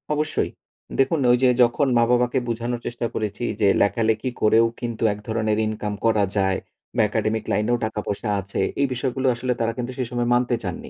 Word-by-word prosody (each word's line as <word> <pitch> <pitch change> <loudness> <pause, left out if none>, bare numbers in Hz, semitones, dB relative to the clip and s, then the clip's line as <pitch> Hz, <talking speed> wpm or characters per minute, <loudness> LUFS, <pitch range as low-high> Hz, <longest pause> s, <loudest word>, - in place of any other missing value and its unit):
অবশ্যই। 150 +1 0 0.5
দেখুন 135 +4 +3
ওই 120 - +5
যে 130 - +6
যখন 120 +4 +2
মা-বাবাকে 125 +2 +3
বোঝানোর 120 +1 -2
চেষ্টা 120 0 -3
করেছি, 105 +1 -3 0.2
যে 100 - +5
লেখালেখি 110 +3 +1
করেও 110 +2 +5
কিন্তু 120 -2 -4
এক 105 - -10
ধরনের 110 -1 0
ইনকাম 105 -1 -3
করা 110 -2 +3
যায়। 95 -1 +1 0.4
বা 120 - +3
Academic 110 +1 -1
লাইনেও 110 +4 +1
টাকা 110 -1 -3
পয়সা 105 +2 -3
আছে। 100 +1 -3 0.2
এই 140 - +3
বিষয়গুলো 130 +1 -1
আসলে 125 +1 -1
তারা 115 0 +1
কিন্তু 125 0 -3
সে 130 - 0
সময় 120 -1 -1
মানতে 125 0 +2
চাননি। 90 -3 -5
115 Hz, 180 wpm, -23 LUFS, 110-125 Hz, 0.5 s, যে